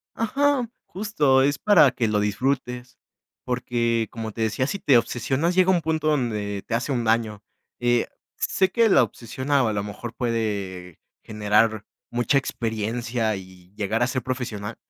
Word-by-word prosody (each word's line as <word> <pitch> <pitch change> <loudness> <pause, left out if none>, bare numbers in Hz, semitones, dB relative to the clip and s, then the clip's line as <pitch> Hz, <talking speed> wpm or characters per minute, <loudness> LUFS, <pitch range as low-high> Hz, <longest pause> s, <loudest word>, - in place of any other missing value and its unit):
Ajá. 265 +2 +1 0.2
Justo, 155 -10 +2
es 140 +1 +2
para 175 -10 +5
que 120 -2 -1
lo 105 -1 +1
disfrutes. 125 +3 -2 0.5
Porque, 120 -2 0
como 110 -1 -5
te 115 - -6
decía, 110 +4 0
si 200 - -2
te 135 -8 +5
obsesionas, 130 +8 0
llega 185 0 +5
un 175 -3 +2
punto, 155 0 -1
donde 105 -9 -1
te 115 - -1
hace 125 +5 -2
un 120 -3 0
daño. 110 -2 0 0.4
Eh, 120 -1 +2 0.3
sé 190 0 +1
que 230 +3 +3
la 135 - +6
obsesión, 120 +4 -6
a 135 -6 +3
lo 100 -1 -1
mejor, 105 +3 -7
puede 100 - -3 0.2
generar 110 +1 +1 0.3
mucha 120 +4 +2
experiencia, 115 -2 -2
y 95 0 -14
llegar 110 +3 0
a - - +2
ser 130 0 -2
profesional. 115 -4 -4
120 Hz, 155 wpm, -24 LUFS, 110-140 Hz, 0.5 s, la